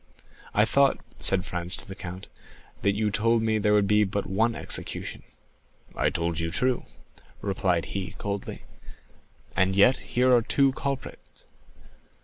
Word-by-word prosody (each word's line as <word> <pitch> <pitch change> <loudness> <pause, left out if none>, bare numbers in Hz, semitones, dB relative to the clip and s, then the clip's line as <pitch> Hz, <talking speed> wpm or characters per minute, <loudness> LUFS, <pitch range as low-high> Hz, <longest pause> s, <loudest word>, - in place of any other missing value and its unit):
"I 105 - +5
thought," 140 +4 +3 0.2
said 95 -1 +1
Franz 90 0 +2
to - - -6
the 95 - -7
count, 95 0 -8 0.5
"that 100 0 +2
you 105 0 0
told 115 +2 +2
me 110 -1 +1
there 105 0 +3
would 105 -1 +4
be 105 +1 +4
but 100 0 -2
one 115 +4 +1
execution." - - -4 0.7
"I - - +2
told 85 0 -2
you 80 0 -1
true," 125 +8 0 0.5
replied 95 -4 0
he 95 -1 -4
coldly. 100 -1 -5 0.9
"And 95 +1 +2
yet 115 +6 +5 0.2
here 125 0 +5
are 120 - +4
two 135 +4 +2
culprits." 140 0 -6
105 Hz, 145 wpm, -26 LUFS, 95-115 Hz, 0.9 s, I